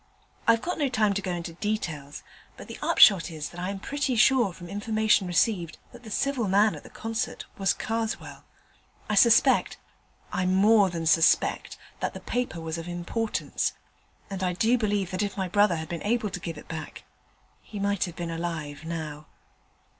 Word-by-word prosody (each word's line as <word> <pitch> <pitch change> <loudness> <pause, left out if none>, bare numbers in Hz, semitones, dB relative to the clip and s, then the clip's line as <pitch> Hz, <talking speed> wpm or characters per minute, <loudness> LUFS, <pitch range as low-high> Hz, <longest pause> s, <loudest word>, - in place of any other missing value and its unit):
I've 230 +1 +4
not 295 -7 -1
time 215 -2 +3
to 200 - -2
go 190 - -4
into 170 -1 -5
details, 165 -8 -4 0.3
but - - -10
the - - -9
upshot 185 -6 +6
is 155 -3 -6
that 175 - -10
I 180 +1 -2
am 200 - -4
pretty 275 +5 -2
sure 240 -2 +4
from 175 0 -11
information 215 0 +1
received 175 -1 +1
that 245 - -13
the 225 - -11
civil 255 +1 0
man 205 +3 +4
at - - -8
the - - -14
concert 225 +2 -4
was 195 -2 +3
Karswell: 225 0 -4 0.6
I - - -1
suspect 235 +4 +4 0.6
I 185 - 0
more 200 +2 +5
than 165 -2 -4
suspect 160 +1 +3 0.2
that - - -3
the - - -6
paper 245 -8 -3
was 160 0 -4
of 165 - -7
importance: 175 +6 -2 0.5
and 195 -2 -6
I 180 -1 0
do 225 +7 +2
believe 205 -5 0
that 185 +1 -2
if 205 0 -3
my 190 -1 -1
brother 205 0 +3
had 160 0 -5
been 170 -2 -4
able 220 -1 0
to 180 - -5
give 165 -2 -6
it - - -12
back, 160 -1 -7 0.6
he 210 - -10
might 200 -1 0
have 175 -2 -8
been 170 -1 -4
alive 160 -3 -4
now. 155 -2 -6
195 Hz, 185 wpm, -27 LUFS, 170-220 Hz, 0.6 s, upshot